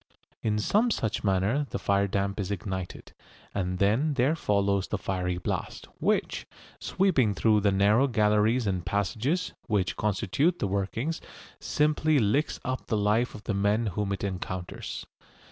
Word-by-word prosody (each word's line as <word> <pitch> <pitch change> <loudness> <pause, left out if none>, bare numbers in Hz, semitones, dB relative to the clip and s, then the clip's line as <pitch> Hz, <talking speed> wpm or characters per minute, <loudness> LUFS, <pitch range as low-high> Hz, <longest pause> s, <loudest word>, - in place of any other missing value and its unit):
In 105 -1 0
some 210 - +2
such 110 - -1
manner 105 +9 +1
the - - -3
fire 100 0 +1
damp 100 +1 -1
is 95 -2 -2
ignited, 95 -2 -5 0.4
and 90 -2 -2
then 115 +11 +2
there 135 +5 +2
follows 100 - +1
the 105 - -2
fiery 90 -2 -2
blast, 90 - -4
which, - - 0 0.3
sweeping 135 - +2
through 110 +1 +3
the 100 0 +3
narrow 105 +7 +4
galleries 110 +1 +2
and 95 -3 -1
passages 110 - -1
which 100 -4 0
constitute 105 - +1
the - - -1
workings, 100 +11 -2 0.4
simply 150 +1 +2
licks 130 +6 +1
up 130 0 -3
the 110 - 0
life 105 +4 +1
of 105 - -10
the 110 - -2
men 100 +3 +1
whom 105 0 -2
it 100 - -3
encounters. 95 -2 -5
105 Hz, 150 wpm, -28 LUFS, 100-125 Hz, 0.4 s, narrow